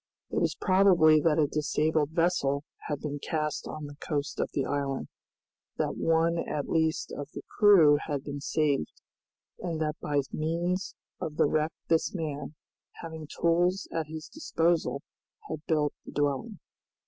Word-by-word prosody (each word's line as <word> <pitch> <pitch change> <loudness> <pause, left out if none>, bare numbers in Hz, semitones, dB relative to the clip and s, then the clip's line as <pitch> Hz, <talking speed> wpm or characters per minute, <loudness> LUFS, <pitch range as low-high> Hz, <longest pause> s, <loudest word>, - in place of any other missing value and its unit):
It - - +1
was - - +1
probable 180 -5 +5
that 155 0 +3
a 155 - +4
disabled 150 +1 +1
vessel 160 -4 +1 0.2
had 145 -2 -3
been 145 -1 -4
cast 150 0 -2
on 155 -1 -6
the 145 0 -10
coast 145 -1 -3
of - - 0
the 140 - -1
island, 140 -1 -2 0.7
that - - -1
one 165 +1 +2
at 150 -3 -3
least 160 -1 0
of 145 0 -6
the - - -6 0.2
crew 165 -9 +7
had 145 -3 -2
been 145 -1 -5
saved, 145 - +1 0.7
and 170 -3 -3
that 155 -1 -2
by 145 -1 +1
means 170 +4 -1 0.2
of 150 - -4
the - - +4
wreck 155 +2 +1 0.2
this 165 +4 +1
man, 150 -3 -4 0.5
having 160 -2 -7
tools 175 +4 +1
at 160 -2 -2
his 160 0 -7
disposal, 170 - 0 0.4
had 155 - -4
built 150 -2 +1
the - - -11
dwelling. 145 - -1
155 Hz, 155 wpm, -29 LUFS, 145-165 Hz, 0.7 s, crew